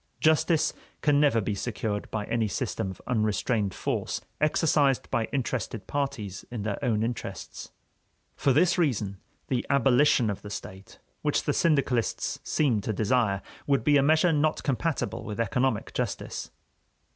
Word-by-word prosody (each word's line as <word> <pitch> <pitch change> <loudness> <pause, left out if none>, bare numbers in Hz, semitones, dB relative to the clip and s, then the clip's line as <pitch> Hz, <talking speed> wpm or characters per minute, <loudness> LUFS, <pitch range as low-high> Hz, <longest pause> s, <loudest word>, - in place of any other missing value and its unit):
Justice 160 0 +3 0.3
can 145 -1 +4
never 145 -6 +4
be 105 0 -1
secured 105 0 -3
by 105 -2 -3
any 115 -1 0
system 95 0 -2
of 95 - -8
unrestrained 110 -2 0
force - - -2 0.2
exercised 150 -3 +2
by 115 - +1
interested 125 -4 -3
parties 110 -9 -3
in 120 -4 -4
their 105 -1 -3
own 110 -3 +1
interests. 120 +1 -5 0.7
For 140 - +2
this 180 +7 +3
reason 105 - 0 0.3
the 125 -2 0
abolition 135 -4 +4
of 100 - -6
the 105 - -8
state, 95 -1 -8 0.2
which - - +1
the - - 0
syndicalists 140 -7 +1
seem 125 -9 +1
to 110 - -2
desire, 100 -1 +1 0.2
would 140 -5 +2
be 145 +4 +4
a 140 - +6
measure 155 +4 +4
not 150 +1 +1
compatible 145 +3 -1
with 105 0 -6
economic 115 0 0
justice. - - -3
120 Hz, 145 wpm, -27 LUFS, 105-145 Hz, 0.7 s, a